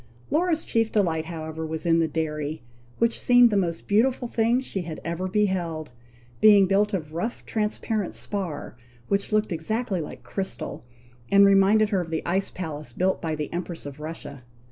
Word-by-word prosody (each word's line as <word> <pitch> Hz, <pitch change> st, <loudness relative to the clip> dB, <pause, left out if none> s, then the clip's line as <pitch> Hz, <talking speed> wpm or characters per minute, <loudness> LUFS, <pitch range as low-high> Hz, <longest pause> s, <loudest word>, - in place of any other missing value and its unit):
Laura's 325 Hz, 0 st, +1 dB
chief 225 Hz, -1 st, +1 dB
delight, 165 Hz, -6 st, +1 dB
however, 160 Hz, -1 st, -5 dB
was 160 Hz, +2 st, -4 dB
in 165 Hz, -1 st, +4 dB
the 165 Hz, -, +2 dB
dairy, 150 Hz, -2 st, -3 dB, 0.3 s
which 230 Hz, 0 st, +1 dB
seemed 245 Hz, -1 st, +6 dB
the -, -, +1 dB
most 170 Hz, -4 st, 0 dB
beautiful 245 Hz, +4 st, +2 dB
thing 235 Hz, +1 st, +2 dB
she 230 Hz, -7 st, -4 dB
had 165 Hz, -2 st, -6 dB
ever 170 Hz, +2 st, -2 dB
beheld, 180 Hz, -6 st, -1 dB, 0.5 s
being 205 Hz, -2 st, +7 dB
built 200 Hz, +2 st, +2 dB
of 155 Hz, -6 st, -3 dB
rough 200 Hz, +9 st, -3 dB
transparent 215 Hz, -1 st, -2 dB
spar, 190 Hz, -10 st, -4 dB, 0.3 s
which 200 Hz, +1 st, 0 dB
looked 215 Hz, -1 st, +1 dB
exactly 190 Hz, +4 st, -1 dB
like 150 Hz, -, -8 dB
crystal, 195 Hz, -1 st, -5 dB, 0.5 s
and 200 Hz, 0 st, +7 dB
reminded 200 Hz, +2 st, +5 dB
her 195 Hz, -3 st, +1 dB
of 170 Hz, -, -6 dB
the 160 Hz, -1 st, -3 dB
ice 190 Hz, +3 st, 0 dB
palace 150 Hz, -7 st, -6 dB
built 185 Hz, +7 st, 0 dB
by 160 Hz, -1 st, -2 dB
the 150 Hz, -1 st, -5 dB
Empress 175 Hz, -2 st, -5 dB
of 145 Hz, 0 st, -8 dB
Russia. 150 Hz, -4 st, -7 dB
185 Hz, 170 wpm, -25 LUFS, 160-210 Hz, 0.5 s, being